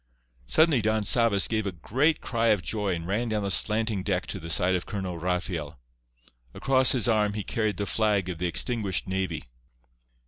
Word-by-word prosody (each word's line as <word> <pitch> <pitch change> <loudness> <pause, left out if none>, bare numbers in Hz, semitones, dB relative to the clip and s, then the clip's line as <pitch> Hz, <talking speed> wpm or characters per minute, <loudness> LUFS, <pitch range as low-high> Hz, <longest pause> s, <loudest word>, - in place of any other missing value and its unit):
Suddenly 155 - +3
Don 110 0 0
Sabas 110 -2 +4
gave 110 -2 -2
a - - -2
great 135 - 0
cry 115 -1 -1
of 105 -5 +2
joy, 105 -3 -2
and 85 -1 -6
ran 110 +6 -2
down 105 -1 -2
the 100 - -2
slanting 110 +2 +1
deck 95 -1 -2
to 95 - -6
the 85 -1 -9
side 90 +2 +2
of 90 - -2
Colonel 95 -4 -5
Rafael. 85 -4 -3 0.8
Across 130 -1 +3
his 125 -4 +2
arm 105 -3 +1
he 105 -1 -4
carried 110 -1 -2
the 100 - -2
flag 105 -2 0
of 90 -3 -5
the 90 - -1
extinguished 100 +2 -1
navy. 95 -4 -3
100 Hz, 185 wpm, -26 LUFS, 90-110 Hz, 0.8 s, Sabas